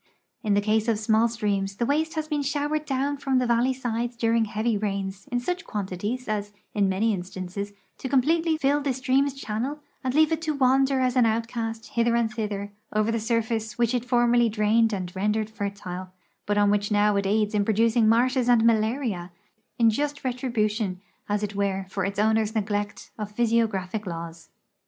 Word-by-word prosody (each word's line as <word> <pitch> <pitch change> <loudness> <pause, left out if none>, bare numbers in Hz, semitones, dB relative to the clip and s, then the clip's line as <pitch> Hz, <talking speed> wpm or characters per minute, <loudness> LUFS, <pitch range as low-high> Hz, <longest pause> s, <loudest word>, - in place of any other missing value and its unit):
In 210 -4 +1
the 205 - +3
case 215 +2 +1
of 225 -2 +2
small 220 +1 +3
streams 200 -4 -1
the 235 - -1
waste 315 +5 0
has 310 -1 -2
been 300 -2 -1
showered 295 +2 -1
down 280 +1 -1
from 270 -2 0
the 250 - +2
val 235 -1 +3
ley 260 - +2
sides 240 -2 -3
during 230 -1 +2
heavy 215 +2 -1
rains 195 -1 -3
i'n 245 - +1
such 360 +9 -3
quantities 205 +5 -4
as, 205 -1 -2 0.2
in 200 -2 +2
many 210 +4 +1
instances, 185 +2 -5 0.3
to 260 - -4
comi)letely 315 +5 +2
fill 285 +1 +2
the 280 -2 0
stream's 270 +1 +1
channel 250 +3 -3 0.3
and 260 0 -1
leave 310 +1 +5
it 320 0 0
to 310 -2 -1
wander 270 0 +3
as 255 0 +1
an 245 -3 +5
outcast 225 0 -2
hither 235 0 +1
and 235 -1 +1
thither 205 -3 -3 0.2
over 215 +1 +1
the 230 - 0
surface 225 -1 -1
which 235 0 +2
it 245 -2 0
formerly 240 -1 +3
drained 220 +1 +2
and 185 -3 -4
rendered 210 +2 0
fertile, 200 -3 -5 0.4
Init 205 0 +1
on 205 0 +4
which 205 0 +1
it - - 0
now 205 0 +3
aids 210 +1 +1
in 205 -1 +2
producing 225 +1 +3
marshes 245 +2 +3
and 235 -2 +5
malaria 220 -5 +1 0.2
— 220 - -46
in 230 -1 +5
just 290 +5 -2
retrilnition, 225 -6 -1 0.3
as 205 0 0
it 210 - -2
Avere. 195 -1 -1
for 195 -1 -1
its 195 0 -3
owner's 220 +1 +2
neglect 205 -1 -2
of 210 -1 -5
physiogra[>hic 220 -4 0
laws. 165 -1 -7
225 Hz, 190 wpm, -25 LUFS, 205-250 Hz, 0.4 s, leave